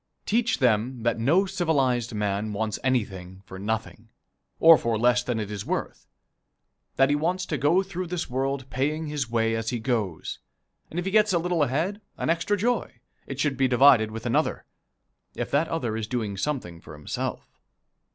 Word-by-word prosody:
Teach 235 +2 +1
them 120 -1 +1
that 115 -1 +1
no 165 - +3
civilized 140 - 0
man 105 0 -1
wants 105 +1 -2
anything 95 -7 -2
for 95 - -9
nothing, 110 +2 -4 0.5
or 165 0 +9
for 115 -6 0
less 125 +2 +3
than 125 -2 -2
it 105 -1 -4
is 100 -1 -4
worth; - - -4 0.9
that 135 +1 +4
he - - +3
wants 180 +5 -1
to 155 - -2
go 150 +8 +3
through 185 -2 -5
this 175 0 -3
world 135 +1 -2
paying 150 +5 -1
his 145 -5 -3
way 115 -1 +1
as 115 0 -2
he 125 - -1
goes, 110 -8 -2 0.5
and 165 - -8
if 175 - -1
he 195 - -1
gets 210 -1 +4
a - - +4
little 175 -1 0
ahead, 160 - 0 0.2
an - - 0
extra 170 +5 0
joy, 230 - -1 0.3
it 135 0 -6
should 145 -1 0
be 135 -1 +3
divided 125 -3 +5
with 110 +1 -7
another, - - 0 0.7
if - - -4
that 145 +4 +2
other 120 -10 -2
is 110 -1 -3
doing 110 -4 -2
something 95 - -3
for 75 - -12
himself. 75 0 -5
130 Hz, 180 wpm, -26 LUFS, 110-165 Hz, 0.9 s, or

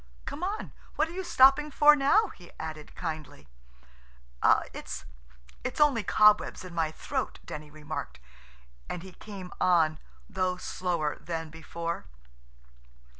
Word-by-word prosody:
Come 310 - -6
on. 405 +4 -3 0.2
What - - +2
are - - -8
you 380 +1 -3
stopping 275 -1 +5
for 295 +1 +7
now?" 330 +10 +4
he 175 - -14
added 155 -1 -7
kindly. 155 - -6 1.3
"It's–it's 60 - -9
only 290 -6 +5
cobwebs 210 -1 +4
in 180 - -9
my 165 -2 +1
throat," - - -3
Denny 150 0 -7
remarked, 150 - -6 0.7
and 180 - -4
he 190 - -10
came 190 -1 -9
on, 160 -4 +4 0.3
though 185 -2 -1
slower 175 -5 -2
than 165 -2 -5
before. 165 +1 -5
180 Hz, 125 wpm, -29 LUFS, 155-255 Hz, 1.3 s, for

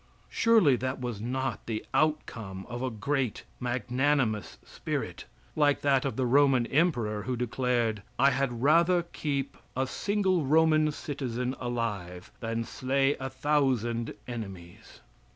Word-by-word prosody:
Surely 220 - +5
that 130 +2 -3
was 120 -5 -4
not 130 +3 -3
the 110 -2 -3
outcome 115 -11 -1
of 120 0 -5
a 130 - 0
great, 125 +2 -2 0.2
magnanimous 125 -1 0
spirit, - - -4 0.3
like 145 -2 +3
that 135 -2 +2
of 135 - -2
the 130 - 0
Roman 135 -1 +4
emperor, 120 -9 +1
who 125 +4 -2
declared: 120 -2 0 0.2
"I 140 +2 +5
had 130 -3 -1
rather 170 +4 +4
keep 140 -4 -3 0.2
a 130 - +2
single 190 +2 0
Roman 155 +1 +4
citizen 130 -4 -3
alive 105 -8 -4
than 115 0 -2
slay 135 +4 +1
a 130 0 -3
thousand 130 -5 0
enemies." 95 -8 -8
130 Hz, 130 wpm, -29 LUFS, 115-145 Hz, 0.3 s, Surely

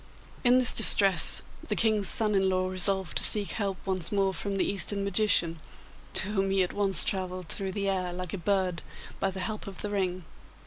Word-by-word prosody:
In 245 0 +3
this 255 -2 +1
distress, 195 -3 +6 0.2
the - - -4
King's 215 -3 0
son 215 +2 +5
in 190 -1 0
law 185 0 -2
resolved 185 -1 -1
to - - +3
seek 205 -2 +5
help 195 -3 -5
once 185 -4 0
more 195 -2 -2
from 200 +1 -6
the - - -1
Eastern 200 0 -2
magician, 180 -4 -1 0.6
to 190 - 0
whom 195 -2 -3
he 195 -1 0
at 180 - -7
once 200 -2 +2
travelled 185 -2 -6
through 190 -1 -5
the 200 0 -5
air 185 -2 -3
like 180 -1 -7
a 200 - -6
bird 185 -2 -3 0.4
by 195 - -2
the 190 0 -8
help 215 +1 -7
of 195 -2 -10
the 205 - -6
ring. 185 -3 -4
195 Hz, 205 wpm, -25 LUFS, 185-205 Hz, 0.6 s, distress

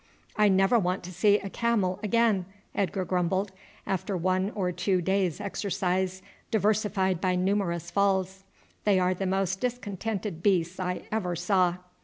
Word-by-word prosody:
"I 210 -1 +4
never 195 +5 +4
want 185 -1 -1
to 180 +1 -8
see 205 +3 +4
a 200 -1 -6
camel 205 -6 0
again," 215 -4 +2 0.3
Edgar 195 -1 -1
grumbled, 185 +2 0 0.3
after 190 +1 -2
one 185 +2 +1
or 185 -3 0
two 185 +1 0
days' 190 -1 0
exercise 190 -2 -2 0.3
diversified 205 -4 +1
by 185 -1 +1
numerous 180 -2 0
falls; 190 -1 +1 0.4
"they 205 -2 +3
are 185 0 +2
the 190 +1 -3
most 190 0 0
discontented 210 -6 -3
beasts 180 -2 +1
I 180 -1 -2
ever 185 -5 -1
saw." 180 0 +2
190 Hz, 145 wpm, -28 LUFS, 180-205 Hz, 0.4 s, I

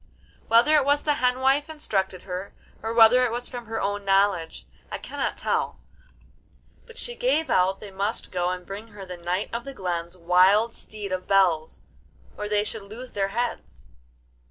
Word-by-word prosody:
Whether 240 +7 +5
it 290 - +4
was 285 +1 +2
the 300 - +2
hen 250 +1 +2
wife 275 +3 +3
instructed 195 - -2
her, 185 +1 -6 0.3
or 225 - -3
whether 230 +2 +7
it 245 - +1
was 240 +1 -4
from 240 -3 -8
her 225 0 -3
own 205 +1 -2
knowledge, 195 -4 +1 0.2
I - - -4
cannot - - -3
tell; - - -1 1.1
but 465 0 -14
she 485 - -5
gave 480 - +1
out 190 0 +3
they 205 - -9
must 200 +4 -3
go 180 -1 0
and 180 0 -4
bring 205 +3 -7
her 205 -3 -10
the 180 -1 -7
Knight 175 +5 -2
of 235 0 -2
the 275 +1 -8
Glen's 175 -3 -3
wild 185 +6 +4
Steed 210 -2 -8
of 185 0 -3
Bells, 175 -5 +2 0.5
or 210 - -5
they 210 0 +2
should 215 +1 -6
lose 225 +6 -9
their 195 -1 0
heads. 235 +4 -4
205 Hz, 180 wpm, -25 LUFS, 185-245 Hz, 1.1 s, whether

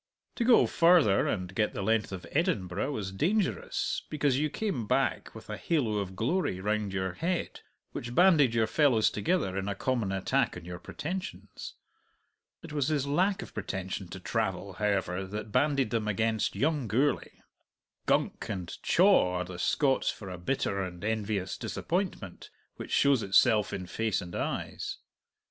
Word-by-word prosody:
To 240 - +1
go 240 0 +6
farther, 165 - +4
and 90 -2 -2
get 105 +2 0
the 100 - -3
length 110 0 +1
of 95 -2 -6
Edinburgh, 140 - 0
was 100 -8 -4
dangerous, 160 - 0
because 145 -3 +1
you 155 +1 +1
came 165 - -3
back - - 0
with - - -11
a - - -5
halo 120 -11 0
of 95 -2 -5
glory 120 - 0
round 105 +1 -1
your 95 -1 -1
head 175 - -2 0.3
which 120 +1 -6
banded 155 -9 +5
your 115 -1 +3
fellows 120 -3 +3
together 105 - 0
in 95 0 -2
a 100 - -2
common 115 -3 -1
attack 95 -1 0
on 85 - -10
your 90 0 -7
pretensions. 185 - -6 0.9
It 165 -2 -9
was 145 -3 0
his 150 -3 +1
lack 185 +7 +1
of - - -12
pretension 95 0 -4
to 95 - -8
travel, 100 -1 -2
however, 95 -2 -1
that 105 +2 -6
banded 140 -3 +2
them 110 -2 -1
against 110 +1 0
young 145 -4 0
Gourlay. 135 +7 0 0.6
"Gunk" - - 0
and 90 -4 -4
"chaw" 180 - +4
are 90 0 -1
the 90 0 -8
Scots 135 - +2
for 95 -3 -6
a 90 - -7
bitter 100 -1 -1
and 90 -1 -6
envious 105 -3 -2
disappointment 175 - -3 0.3
which - - -8
shows 140 -4 +3
itself 105 +1 +4
in 90 - -4
face 110 +2 -1
and 90 -3 -7
eyes. - - -3
110 Hz, 160 wpm, -29 LUFS, 95-145 Hz, 0.9 s, go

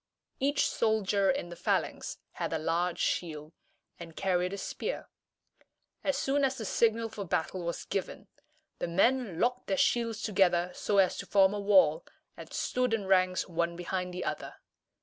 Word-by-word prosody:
Each 285 +2 +2
soldier 205 -3 +1
in 270 -10 -1
the 175 - -8
phalanx - - -1
had - - -4
a - - +1
large 170 +2 0
shield, 155 -2 -2 0.5
and 165 -2 -10
carried 180 -1 0
a 200 - -4
spear. - - -4 1.0
As 285 - 0
soon 280 +1 +1
as 265 -1 +1
the 220 - -5
signal 230 +2 +2
for 210 -2 -6
battle 180 0 -2
was 170 0 -4
given, 195 - -4 0.5
the - - -2
men 195 +1 +1
locked 250 +1 0
their 195 - 0
shields 230 -1 +1
together 180 -4 +2
so 205 - -1
as 190 -2 +4
to - - -6
form 195 -1 +4
a 205 - -2
wall, 185 -6 +4 0.3
and - - -11
stood 250 -2 0
in 205 -3 -4
ranks 185 -1 +2
one 170 -1 -1
behind 180 +1 -3
the 180 0 -5
other. - - -4
190 Hz, 170 wpm, -30 LUFS, 175-225 Hz, 1.0 s, as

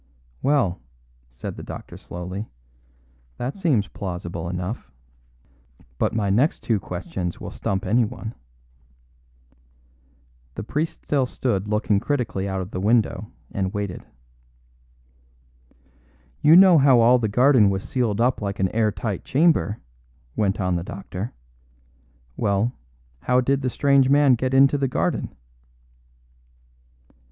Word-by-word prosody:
"Well," 130 - +1 0.5
said 60 +1 -7
the - - -7
doctor - - -9
slowly, 90 +5 -7 0.9
"that 125 +3 -4
seems 150 - +1
plausible 90 -4 -5
enough. 90 +5 -5 1.1
But - - 0
my 100 -3 0
next 130 +11 +2
two 110 -3 +1
questions 90 -1 -5
will - - -7
stump 100 +2 -3
anyone." 115 +2 0 2.2
The - - -5
priest 150 +8 -3
still 135 -3 +1
stood 105 -6 -2
looking 105 -1 +1
critically 110 -7 -2
out 95 0 -2
of 95 +3 -7
the 90 - -4
window 105 -1 +1 0.2
and 95 0 -2
waited. 100 -3 -4 2.4
"You 155 +2 +7
know 185 -3 +8
how 135 -3 +6
all 120 +2 +5
the 110 - 0
garden 125 0 +5
was 95 -1 -3
sealed 115 -5 -1
up 125 0 +2
like 100 -1 -3
an 95 -1 +2
air 110 0 +1
tight 105 -3 -4
chamber," 145 -7 +2 0.6
went 100 -1 0
on 90 -2 0
the 85 - -4
doctor. 100 +3 -6 1.0
"Well, 100 +4 0 0.5
how 125 - +2
did 135 +2 +1
the 130 - 0
strange 140 0 +3
man 140 -1 +5
get 130 +2 0
into 135 +1 +5
the 135 - +1
garden?" 130 - -2
110 Hz, 125 wpm, -23 LUFS, 95-130 Hz, 2.4 s, know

